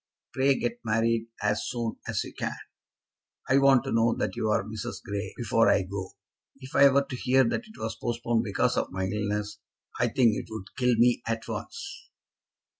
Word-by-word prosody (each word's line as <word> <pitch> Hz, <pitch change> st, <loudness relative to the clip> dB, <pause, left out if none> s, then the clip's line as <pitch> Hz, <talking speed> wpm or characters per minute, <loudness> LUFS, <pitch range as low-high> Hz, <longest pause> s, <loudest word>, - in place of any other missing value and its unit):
Pray 135 Hz, +1 st, +3 dB
get 120 Hz, 0 st, -2 dB
married 115 Hz, +1 st, +1 dB, 0.2 s
as 105 Hz, 0 st, 0 dB
soon 115 Hz, -2 st, -3 dB
as -, -, -1 dB
you -, -, -10 dB
can. -, -, -4 dB, 0.9 s
I 135 Hz, -, +4 dB
want 135 Hz, -2 st, +5 dB
to -, -, -4 dB
know 115 Hz, 0 st, +3 dB
that -, -, -2 dB
you 110 Hz, -, -1 dB
are 105 Hz, -, +2 dB
Mrs. 105 Hz, -2 st, -6 dB
Grey 100 Hz, +1 st, -4 dB
before 115 Hz, -1 st, +3 dB
I 95 Hz, -, +3 dB
go. 95 Hz, 0 st, -6 dB, 0.5 s
If 130 Hz, -1 st, -10 dB
I 140 Hz, 0 st, +8 dB
were 140 Hz, +1 st, +3 dB
to 130 Hz, -, -5 dB
hear 130 Hz, +1 st, +3 dB
that 215 Hz, -, -1 dB
it 220 Hz, -, -15 dB
was -, -, -4 dB
postponed 120 Hz, -1 st, -1 dB
because 100 Hz, -4 st, 0 dB
of -, -, -1 dB
my 95 Hz, 0 st, -2 dB
illness, 105 Hz, +1 st, -2 dB, 0.4 s
I 120 Hz, -, +3 dB
think 120 Hz, -2 st, +3 dB
it -, -, -4 dB
would 110 Hz, -3 st, -8 dB
kill 125 Hz, -2 st, +2 dB
me 120 Hz, +1 st, +3 dB
at 115 Hz, 0 st, -2 dB
once." 465 Hz, -3 st, -7 dB
115 Hz, 190 wpm, -27 LUFS, 105-125 Hz, 0.9 s, I